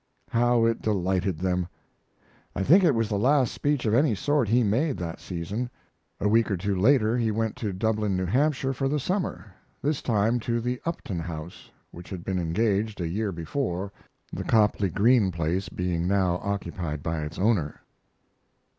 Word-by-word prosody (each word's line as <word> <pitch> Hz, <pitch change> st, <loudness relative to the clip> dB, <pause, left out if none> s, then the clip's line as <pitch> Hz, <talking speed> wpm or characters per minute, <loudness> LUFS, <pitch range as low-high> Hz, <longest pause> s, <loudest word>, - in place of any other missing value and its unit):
How 120 Hz, 0 st, +3 dB
it 115 Hz, 0 st, +1 dB
delighted 95 Hz, -3 st, 0 dB
them! 90 Hz, 0 st, -1 dB, 0.9 s
I 95 Hz, -, -1 dB
think 180 Hz, -, +6 dB
it 155 Hz, -7 st, +4 dB
was 115 Hz, -1 st, +1 dB
the 105 Hz, -2 st, -1 dB
last 130 Hz, +2 st, +3 dB
speech 145 Hz, -3 st, 0 dB
of 110 Hz, -, +1 dB
any 125 Hz, -1 st, +3 dB
sort 145 Hz, +3 st, +1 dB
he 120 Hz, +2 st, +4 dB
made 130 Hz, +8 st, +1 dB
that 85 Hz, -2 st, -5 dB
season. 100 Hz, +8 st, -4 dB, 0.5 s
A 105 Hz, -, +1 dB
week 115 Hz, +2 st, +3 dB
or 100 Hz, -, 0 dB
two 100 Hz, +3 st, -1 dB
later 110 Hz, +2 st, +3 dB
he 115 Hz, -2 st, +1 dB
went 110 Hz, 0 st, -1 dB
to 105 Hz, -3 st, -2 dB
Dublin, 105 Hz, 0 st, 0 dB
New 95 Hz, -, -1 dB
Hampshire, 135 Hz, -, +1 dB
for 135 Hz, +1 st, -1 dB
the 150 Hz, +2 st, 0 dB
summer 180 Hz, -, -3 dB, 0.3 s
this 145 Hz, 0 st, -1 dB
time 115 Hz, +1 st, +1 dB
to 120 Hz, 0 st, -1 dB
the 125 Hz, +2 st, -3 dB
Upton 105 Hz, -, -3 dB
House, 80 Hz, 0 st, -7 dB, 0.2 s
which 85 Hz, +1 st, -11 dB
had 90 Hz, -3 st, -6 dB
been 95 Hz, -1 st, -1 dB
engaged 105 Hz, +4 st, 0 dB
a 85 Hz, -, -1 dB
year 100 Hz, +4 st, -2 dB
before, 95 Hz, -, -3 dB, 0.4 s
the -, -, -3 dB
Copley 105 Hz, -3 st, +2 dB
Greene 105 Hz, +1 st, +3 dB
place 85 Hz, +3 st, -2 dB
being 90 Hz, -1 st, -2 dB
now 95 Hz, -2 st, +2 dB
occupied 85 Hz, -6 st, -4 dB
by 80 Hz, -1 st, -2 dB
its 75 Hz, +2 st, -6 dB
owner. 95 Hz, -6 st, +1 dB
105 Hz, 175 wpm, -26 LUFS, 90-120 Hz, 0.9 s, think